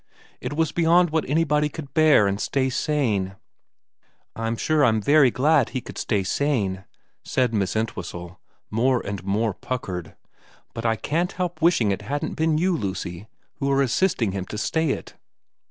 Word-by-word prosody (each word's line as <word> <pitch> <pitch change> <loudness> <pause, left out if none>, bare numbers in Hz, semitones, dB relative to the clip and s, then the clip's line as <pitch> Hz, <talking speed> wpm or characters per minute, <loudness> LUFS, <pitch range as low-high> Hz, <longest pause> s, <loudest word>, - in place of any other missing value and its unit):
It - - -4
was 160 +1 0
beyond 170 0 +3
what 160 -4 -1
anybody 150 -1 +2
could 145 -2 -9
bear 155 -9 +5
and 100 +1 -1
stay 130 -1 0
sane 110 -11 0 0.4
' - - -58
' - - -42
I'm 115 0 -2
sure 155 +3 +2
I'm 110 -4 +4
very 140 +4 +5
glad 140 +1 +3
he 130 - -4
should - - -8
stay 105 -4 0
sane,' 100 -5 -1 0.4
said 125 -3 0
Miss 100 -3 0
Entwhistle, 90 -5 -4 0.3
more 125 +3 +1
and 100 -2 -4
more 105 +3 0
puckered, 90 -8 -5 0.3
' - - -30
but 115 0 -2
I 115 - +2
can't 170 - -1
help 180 -2 -3
wishing 155 - +3
it 100 - -2
hadn't 145 +8 -3
been 160 -1 +1
you, 180 +2 +2
Lucy, 95 - -4 0.3
who 140 - -1
are 140 0 +3
assisting 130 - +1
him 95 -1 -4
to 105 - -7
stay 160 +8 0
it.' - - -4
130 Hz, 175 wpm, -24 LUFS, 105-155 Hz, 0.4 s, bear